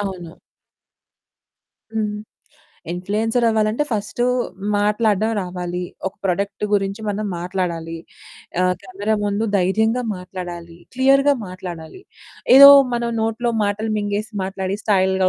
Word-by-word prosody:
అవును. 185 -4 -6 1.6
హ్మ్. 210 -1 -1 0.8
ఇన్‌ఫ్లుయెన్సర్ 215 +7 -1
అవ్వాలంటే 220 +4 +1
ఫస్ట్ 215 +2 -3 0.5
మాట్లాడడం 210 +1 +1
రావాలి. 180 -1 -4 0.3
ఒక 190 - -8
ప్రొడక్ట్ 200 +2 -2
గురించి 200 +1 0
మనం 210 +1 -2
మాట్లాడాలి. 170 -2 -3 0.6
ఆహ్, 180 0 +2
కెమెరా 200 +3 -2
ముందు 205 +1 0
ధైర్యంగా 220 +6 +1
మాట్లాడాలి. 175 -2 -8 0.2
క్లియర్‌గా 275 +2 +4
మాట్లాడాలి. 180 - -8 0.5
ఏదో 280 +1 +11 0.3
మనం 235 0 -1
నోట్లో 225 +2 -1
మాటలు 210 +2 -1
మింగేసి 205 +1 -3
మాట్లాడి 190 +1 -3
స్టైల్‌గా 190 -2 +2
200 Hz, 100 wpm, -20 LUFS, 185-220 Hz, 1.6 s, ఏదో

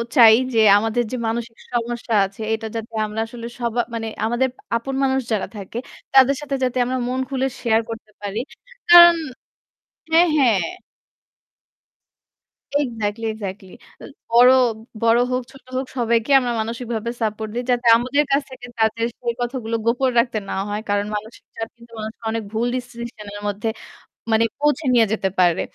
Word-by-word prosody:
চাই 225 -4 +9 0.2
যে 225 - +3 0.2
আমাদের 225 +3 0
যে, - - -2
মানসিক 230 0 -4 0.2
সমস্যা 240 0 -2
আছে 195 +3 -10
এটা 220 0 -3
যাতে 225 0 -6
আমরা 215 +1 -5
আসলে 230 0 -9
সব 235 -2 -2 0.2
মানে 225 -1 -3 0.2
আমাদের 240 +3 +1 0.3
আপন 265 +4 -3
মানুষ 265 0 +2
যারা 205 - -1
থাকে 205 +3 -7 0.4
তাদের 270 +1 +6
সাথে 280 -2 -3
যাতে 255 0 0
আমরা 255 +1 -2
মন 255 +1 -2
খুলে 265 -1 -1 0.2
share 225 -2 +2
করতে 220 -1 -8
পারি। 205 +2 -3 0.5
কারণ 345 0 +10 1.0
হ্যাঁ, 335 +2 +6
হ্যাঁ। 235 -9 +4 2.2
Exactly, 225 -2 -3
exactly. 195 -3 -7 0.3
এ - - -11 0.3
বড় 245 +2 +8 0.5
বড় 230 +1 +4
হোক, 255 - 0
ছোট 270 -2 -17
হোক 260 +1 -1
সবাইকে 235 +2 +1
আমরা 245 -2 -2
মানসিকভাবে 230 0 -4
support 215 0 -2
দিই। 245 - -2
যাতে 245 0 0
আমাদের 255 +5 +1
কাছ 275 - +3
থেকে 250 -2 -10
তাদের 220 +1 +1
সেই 235 -1 -2
কথাগুলো 240 -2 -3
গোপন 250 +3 +2
রাখতে 235 -2 +1
না - - -2 0.2
হয়। 210 +1 -3
কারণ 205 0 +1
মানসিক 215 +2 -7
চাপ 225 0 -4
কিন্তু 235 0 -18
অনেক 220 +1 -5
সময় 225 - -6
অনেক 225 -1 -2
ভুল 230 +2 0
decision 235 -3 -7
এর 205 - -7
মধ্যে 205 +2 -3 0.6
মানে 220 +1 +4 0.2
পৌঁছে 295 +1 +1
নিয়ে 230 -2 +5
যেতে 195 -3 0
পারে। 175 -2 +4
235 Hz, 165 wpm, -21 LUFS, 220-250 Hz, 2.2 s, কারণ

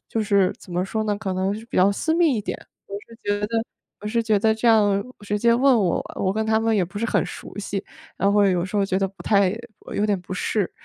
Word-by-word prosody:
就 225 - -1
是 200 -3 +3
怎 185 - -15
么 180 +1 0
说 220 +3 -2
呢， 205 -1 0
可 200 -3 -3
能 190 +2 0
是 220 +2 -8
比 - - -6
较 190 +2 +5
私 320 +10 -1
密 330 -6 +3
一 210 - -2
点。 - - -4 0.3
我 200 - -8
是 230 - -14
觉 205 0 0
得 225 0 -1 0.4
我 210 - -7
是 230 +2 0
觉 220 -2 +2
得 220 +2 +3
这 230 +2 +1
样 205 -3 +4 0.2
直 205 0 -2
接 235 +2 +4
问 265 +1 +4
我， 180 -3 +1 0.2
我 190 - +1
跟 220 - 0
他 220 0 +2
们 225 -1 +1
也 185 - +2
不 200 +4 -8
是 230 - -1
很 - - +1
熟 - - -9
悉， 200 -1 -3 0.4
然 200 - +3
后 205 - +2
会 200 -1 +5
有 175 -1 0
时 190 +3 -4
候 200 - +3
觉 190 -1 0
得 195 -1 0
不 195 - -14
太 200 -1 +3 0.4
有 205 - +1
点 200 -3 +1
不 180 +1 -7
适， 200 +1 -1
205 Hz, 295 characters per minute, -23 LUFS, 195-220 Hz, 0.4 s, 较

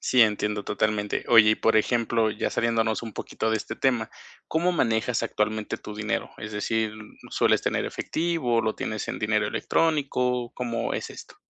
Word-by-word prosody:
Sí, 125 -2 +5
entiendo 105 -1 0
totalmente. 105 -1 -1
Oye, 110 -2 +7
y 110 - +4
por 115 0 +2
ejemplo, 115 0 +2
ya 105 - -2
saliéndonos 115 -1 0
un 115 -2 -6
poquito 110 - -3
de 110 - +2
este 110 +1 -6
tema, 120 -4 +1 0.4
¿cómo 175 +3 +1
manejas 115 -5 +1
actualmente 110 0 -1
tu 105 - -9
dinero? 105 +1 -2
Es 105 0 -7
decir, 110 +1 -1 0.4
¿sueles - - +2
tener - - 0
efectivo, 155 -9 0
lo 110 -1 -1
tienes 110 -2 -4
en - - -3
dinero 110 -1 +1
electrónico? 125 -4 0
¿Cómo 120 -2 -2
es - - -4
esto? - - -12
110 Hz, 165 wpm, -26 LUFS, 110-120 Hz, 0.4 s, Oye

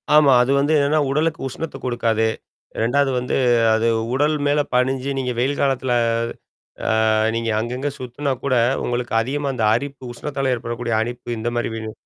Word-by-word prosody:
ஆமா. 145 -3 +6
அது 135 - 0
வந்து 145 +3 +1
என்னன்னா 145 +2 +2
உடலுக்கு 155 +3 0
உஷ்ணத்த 135 +2 -6
குடுக்காது. 115 -2 +1 0.5
2வது 135 +4 +2
வந்து 125 - -2 0.4
அது 110 +1 +2 0.3
உடல் 150 +3 +2
மேல 145 +1 +2
பணிஞ்சு 130 +2 +1
நீங்க 125 -1 -1
வெயில் 135 +3 0
காலத்துல 130 -2 +1 1.2
அ - - +3 0.2
நீங்க 115 0 -1
அங்கங்க 125 +5 -3
சுத்துனா 130 +3 -3
கூட 135 -2 +1 0.3
உங்களுக்கு 120 -1 -2
அதிகமா 140 +3 -2
அந்த 115 - -2
அரிப்பு 140 +2 -5
உஷ்ணத்தால 135 +1 -2
ஏற்படக்கூடிய 120 0 -4
அரிப்பு 120 +1 -5
இந்த 115 +2 -2
மாரி 120 - -1
விணு 110 -1 -5
130 Hz, 155 wpm, -21 LUFS, 120-140 Hz, 1.2 s, ஆமா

